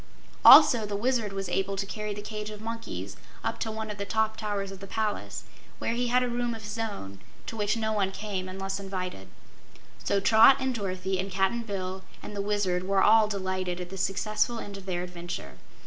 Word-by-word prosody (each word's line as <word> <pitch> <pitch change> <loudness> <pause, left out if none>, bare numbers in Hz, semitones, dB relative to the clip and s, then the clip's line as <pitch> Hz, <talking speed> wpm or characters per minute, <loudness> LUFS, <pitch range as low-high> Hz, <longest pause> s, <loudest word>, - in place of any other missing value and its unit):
Also 280 -7 +10
the 205 -1 -3
Wizard 230 -1 0
was 195 -1 -4
able 195 +2 -1
to 195 0 -2
carry 210 +1 -4
the 205 0 -6
cage 210 0 -5
of 210 -1 -8
monkeys 230 +1 -6 0.3
up - - -2
to 225 - -2
one 220 0 -4
of 205 - -8
the - - -1
top 220 +1 0
towers 205 -3 -3
of 195 - -9
the 195 - -9
palace, 215 0 -3 0.3
where - - -1
he 245 +1 0
had 250 +1 +3
a - - 0
room 240 -1 -1
of 220 - -10
his 210 +2 -5
own, 150 - -5 0.3
to - - -6
which 210 +1 0
no 220 -1 0
one 200 -3 +1
came 195 -2 -4
unless 195 +1 -4
invited. 185 - -5 0.8
So 200 - +2
Trot 225 +6 +7
and 265 -1 0
Dorothy 190 -3 -2
and 190 +1 -2
Cap'n 195 +5 +1
Bill 190 -3 -4 0.2
and 210 - -7
the 200 - -1
Wizard 200 -3 0
were 195 -1 +3
all 220 0 +6
delighted 185 -3 -2
at 180 0 -6
the - - -5
successful 210 +5 0
end 205 -3 -7
of 195 -1 -10
their 175 -1 -1
adventure. 175 - -7
205 Hz, 210 wpm, -28 LUFS, 190-220 Hz, 0.8 s, Also